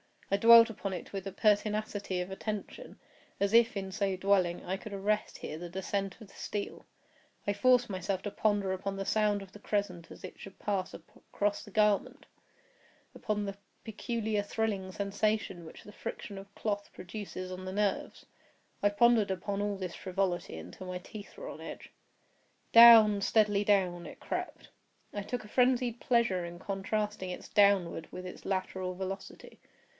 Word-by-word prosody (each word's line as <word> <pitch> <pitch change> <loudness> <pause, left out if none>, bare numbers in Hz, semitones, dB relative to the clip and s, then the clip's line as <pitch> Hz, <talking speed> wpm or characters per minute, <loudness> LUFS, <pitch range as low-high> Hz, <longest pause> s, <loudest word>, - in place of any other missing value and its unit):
I - - +5
dwelt 230 +2 +9
upon 195 -3 -4
it 180 - -7
with 195 0 -4
a - - -4
pertinacity 205 -2 0
of 180 +2 -5
attention—as 200 0 -5
if, 230 0 +5
in 190 -1 -4
so 195 -1 0
dwelling, 185 -2 +1
I 190 +2 -2
could 215 +1 -9
arrest 210 +2 -1
here 155 - -6
the 175 0 -6
descent 190 +1 -3
of 215 - -11
the - - -18
steel. 205 -1 -5 0.6
I 205 - +1
forced 245 +3 +4
myself 190 0 -2
to 205 - -3
ponder 205 -2 +1
upon 195 +1 -3
the 195 0 -4
sound 210 -1 +2
of 190 - -14
the 210 - -12
crescent 200 -5 -2
as - - -12
it 185 - -9
should 195 - -11
pass 195 -3 -2
across 205 0 -3
the - - -12
garment—upon 210 - -3
the 195 0 -5 0.3
peculiar 220 -1 -2
thrilling 205 -2 -2
sensation 200 -3 -1
which 160 - -12
the 210 - -12
friction 200 0 -7
of 195 +1 -11
cloth 205 -2 -3
produces 185 0 -7
on 185 0 -6
the 185 - -5
nerves. 205 -1 -1 0.6
I 205 - +4
pondered 225 0 +4
upon 200 +2 -2
all 205 0 -1
this 185 -3 -5
frivolity 185 -1 -2
until 185 - -9
my 180 0 -3
teeth 205 - -11
were - - -7
on - - -8
edge. - - -9 0.8
Down—steadily 215 -2 +7
down 180 -4 +2
it - - -12
crept. - - -5 0.4
I 205 - -3
took 245 +3 -4
a - - -11
frenzied 250 -1 +2
pleasure 235 -8 +2
in 170 0 -8
contrasting 200 +1 -3
its 180 - -7
downward 195 -5 +3
with 180 - -7
its 180 - -9
lateral 185 -1 -2
velocity. 190 +1 -7
200 Hz, 165 wpm, -31 LUFS, 190-215 Hz, 0.8 s, dwelt